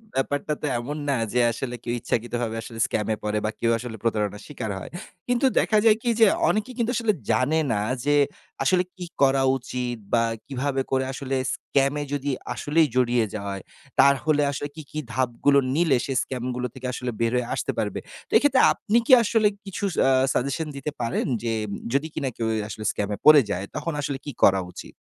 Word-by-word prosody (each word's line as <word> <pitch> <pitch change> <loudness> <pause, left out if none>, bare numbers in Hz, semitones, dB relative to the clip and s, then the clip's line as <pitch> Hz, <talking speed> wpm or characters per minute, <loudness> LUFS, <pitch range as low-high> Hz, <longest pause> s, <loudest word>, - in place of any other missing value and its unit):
ব্যাপারটা 145 +3 -1
তো - - -2
এমন 140 +6 -5
না 140 - +2 0.2
যে 125 - +2
আসলে 125 +1 -4
কেউ 120 - -2
ইচ্ছাকৃতভাবে 120 0 -2
আসলে 115 0 -9
স্ক্যামে 110 0 -1
পড়ে 105 0 -1
বা 110 - 0
কেউ 115 - +2
আসলে 120 -1 -6
প্রতারণার 105 -2 -1
শিকার 125 -7 -5
হয়। - - -9 0.4
কিন্তু 245 +1 +2
দেখা 215 - +2
যায় 220 -1 +6
কি 240 - -1
যে 225 - +8 0.2
অনেকেই 215 +4 -1
কিন্তু 235 -1 0
আসলে 225 -3 +2 0.2
জানে 140 +5 +2
না 105 - 0 0.2
যে 145 0 +3 0.5
আসলে 180 +6 +3
কি 180 -2 -6 0.2
করা 135 -1 +4
উচিত? 125 -1 -4 0.2
বা 115 -1 +4 0.2
কিভাবে 135 0 -1
করে 130 0 +1
আসলে 135 0 -3 0.2
স্ক্যামে 140 +1 0
যদি 145 0 -1 0.2
আসলেই 155 +2 +2
জড়িয়ে 120 -2 +3
যায়, 100 -2 -4 0.4
তাহলে 145 +2 +4
আসলে 145 +1 -4
কি, 160 - -7
কি 155 - -3
ধাপগুলো 130 +3 +2 0.2
নিলে 160 -5 +3
সে 135 - -2
স্ক্যামগুলো 125 -1 -3
থেকে 130 -1 -6
আসলে 125 +1 -3
বের 115 0 +1
হয়ে 125 -1 0
আসতে - - -1
পারবে? - - -2 0.3
তো - - -31
এক্ষেত্রে 280 -3 +4
আপনি 220 +2 0
কি - - +1
আসলে 220 -1 +3 0.2
কিছু 195 0 -6
স - - -6
আ - - +5 0.2
সাজেশন 140 +5 -1
দিতে 140 +2 -4
পারেন? 115 -1 -1 0.2
যে 115 - 0 0.4
যদি 140 +3 +1
কিনা 140 -3 -2
কেউ 115 - -1
এ - - 0
আসলে 110 0 -7
স্ক্যামে 105 0 -3
পড়ে 155 -1 +9
যায়, 95 0 -2
তখন 155 +1 -3
আসলে 140 -1 -2
কি 145 - -4
করা 95 -1 +6
উচিত? - - -10
135 Hz, 190 wpm, -24 LUFS, 120-150 Hz, 0.5 s, পড়ে